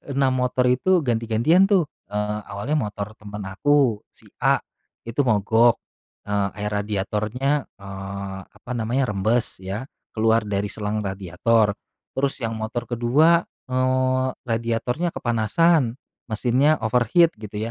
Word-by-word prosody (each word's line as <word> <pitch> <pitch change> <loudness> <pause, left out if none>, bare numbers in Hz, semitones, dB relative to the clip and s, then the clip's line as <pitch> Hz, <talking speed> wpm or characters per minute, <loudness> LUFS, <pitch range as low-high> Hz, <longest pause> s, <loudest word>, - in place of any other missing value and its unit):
6 135 -1 +3
motor 125 0 +1
itu 175 +9 +3
ganti-gantian 120 - +3
tuh. 180 -7 +2 0.2
Eee, 105 +1 -2
awalnya 125 +10 -2
motor 105 -4 -3
teman 105 -1 -8
aku, 135 -1 +2
si - - -20
A - - +3 0.4
itu 115 +4 -7
mogok. 110 +1 +4 0.5
Eee, 100 -1 0
air 105 - -1
radiatornya, 105 +7 -1 0.2
eee, 95 0 -6
apa 125 - -12
namanya 120 +3 0
rembes 110 +4 0
ya, 100 +8 -5 0.3
keluar 110 0 +3
dari 100 0 -1
selang 105 0 -3
radiator. 100 +3 +1 0.4
Terus 135 +1 0
yang 115 -2 -2
motor 110 +2 -4
kedua, 140 +9 +4 0.3
eee, 130 0 +1 0.2
radiatornya 115 +8 -1
kepanasan, 120 +3 +2 0.3
mesinnya 130 +7 +2
overheat 125 +9 +3
gitu 105 -1 -7
115 Hz, 120 wpm, -23 LUFS, 105-130 Hz, 0.5 s, mogok